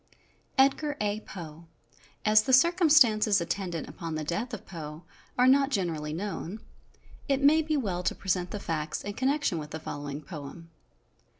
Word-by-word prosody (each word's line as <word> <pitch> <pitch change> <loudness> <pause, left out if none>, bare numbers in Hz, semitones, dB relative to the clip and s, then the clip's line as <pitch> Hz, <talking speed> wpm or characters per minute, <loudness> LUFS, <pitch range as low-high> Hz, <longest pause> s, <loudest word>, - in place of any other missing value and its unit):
"EDGAR 290 +2 +3
A. 205 0 -1
POE. 165 -5 -10 0.6
As 215 0 +6
the 260 +4 -1
circumstances 260 - +5
attendant 175 -1 -3
upon 165 -2 -6
the 155 - -3
death 205 - -3
of 220 - -7
Poe 155 -2 -8 0.3
are 250 - +5
not 275 +1 +5
generally 165 - -2
known, 195 +3 -4 0.7
it 275 0 +1
may 310 +3 +6
be 310 -1 -1
well 190 -9 -2
to 180 - -1
present 180 -2 -1
the 210 - -5
facts 155 -4 -3
in 205 - -4
connection 265 - 0
with 150 -1 -7
the 160 - -6
following 145 -1 -6
poem. 165 +1 -9
195 Hz, 160 wpm, -28 LUFS, 165-260 Hz, 0.7 s, As